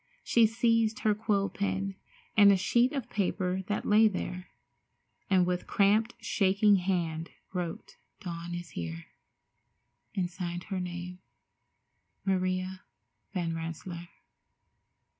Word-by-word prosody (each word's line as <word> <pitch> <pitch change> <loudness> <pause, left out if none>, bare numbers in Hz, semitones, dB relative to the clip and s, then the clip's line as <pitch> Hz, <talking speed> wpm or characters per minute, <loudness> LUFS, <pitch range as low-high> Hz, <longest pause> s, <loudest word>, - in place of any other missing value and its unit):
She 230 -2 +5
seized 225 -1 +2
her 215 - +3
quill 205 -2 +1
pen 195 -1 -2 0.4
and 205 -1 +8
a 195 - +5
sheet 240 +7 +3
of 275 -3 -3
paper 190 -2 -1
that 205 - -2
lay 215 +1 +6
there, 185 -2 -4 0.8
and 185 -2 +4
with 180 0 -2
cramped, 215 +4 +3
shaking 200 0 +3
hand 170 -3 -1 0.2
wrote, 175 -3 -5 0.2
"Dawn 170 -1 -5
is 175 -1 -7
here," 85 -1 -5 1.1
and 185 -3 +1
signed 175 -1 -5
her 190 -2 -1
name, 180 0 -5 1.1
"Maria 185 0 0 0.5
Van 170 -2 -1
Rensselaer." 170 +1 -6
185 Hz, 115 wpm, -30 LUFS, 175-205 Hz, 1.1 s, and